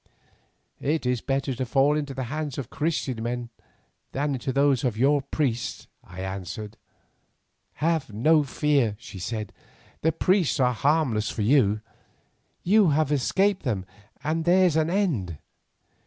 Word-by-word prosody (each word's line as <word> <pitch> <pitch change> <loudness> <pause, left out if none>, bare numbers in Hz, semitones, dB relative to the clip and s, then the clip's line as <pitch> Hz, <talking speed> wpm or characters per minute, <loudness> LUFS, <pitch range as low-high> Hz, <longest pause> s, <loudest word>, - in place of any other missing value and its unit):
"It 155 0 -1
is 125 -2 0
better 135 0 -1
to 130 +1 -3
fall 135 +5 +3
into 145 -3 -3
the 130 - -3
hands 145 +2 -4
of 135 -4 -5
Christian 145 -7 -2
men 120 +1 -3 0.6
than 145 +1 0
into 130 0 -2
those 140 -1 +2
of 120 -5 0
your 140 +4 +3
priests," 135 -4 -2 0.2
I 90 +1 -9
answered. 95 +3 -6 1.0
"Have 160 -4 0
no 150 +9 +4
fear," 140 -5 +1
she 105 -4 -10
said; 105 +3 -4 0.5
"the 160 - +3
priests 180 -3 +1
are 125 -1 +3
harmless 130 -4 +1
for 110 - -2
you. 110 -4 +3 0.8
You 200 0 +5
have 150 0 +1
escaped 190 +8 +2
them 105 -8 -2 0.4
and 160 +2 0
there's 180 -1 +4
an 160 0 +2
end. 145 - 0
135 Hz, 140 wpm, -25 LUFS, 115-155 Hz, 1.0 s, You